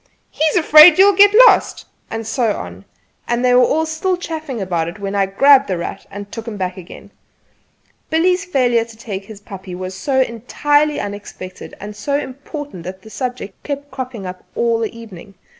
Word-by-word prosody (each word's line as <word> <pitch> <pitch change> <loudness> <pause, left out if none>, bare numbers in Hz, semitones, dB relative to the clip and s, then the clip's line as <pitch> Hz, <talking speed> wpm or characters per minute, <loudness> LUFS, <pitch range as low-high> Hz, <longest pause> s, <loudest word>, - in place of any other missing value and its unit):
"He - - -3
is 310 - +1
afraid 310 -1 +8
you'll 400 +2 +6
get 405 +1 +7
lost!" - - +3 0.2
and 225 0 -5
so 225 -2 -1
on; 90 +2 -9 0.4
and 240 +1 0
they 250 - +4
were 255 +6 +3
still 320 +4 -1
chaffing 315 -7 -6
about 175 -4 -2
it 170 +4 -7
when 200 -1 -5
I 200 -1 +1
grabbed 275 +7 +5
"The 185 - -2
Rat" 170 +3 -6
and 200 0 -9
took 225 0 -8
him 215 -3 -6
back 185 -1 -3
again. 185 -2 -12 1.0
Billy's 360 +4 +2
failure 250 -10 +1
to 230 -1 -14
take 200 -4 -7
his 215 -1 -11
puppy 190 -2 -9
was 185 +1 -6
so 265 +7 -1
entirely 290 +5 0
unexpected 200 -2 -8
and 205 +1 -8
so 280 +7 -2
important 280 - -7
that 185 +1 -8
the 220 - -13
subject 245 -3 -6
kept 285 0 -6
cropping 255 -6 -6
up 180 0 -8
all 230 -1 +1
the 225 -2 -2
evening. 200 -3 -12
230 Hz, 185 wpm, -18 LUFS, 195-285 Hz, 1.0 s, afraid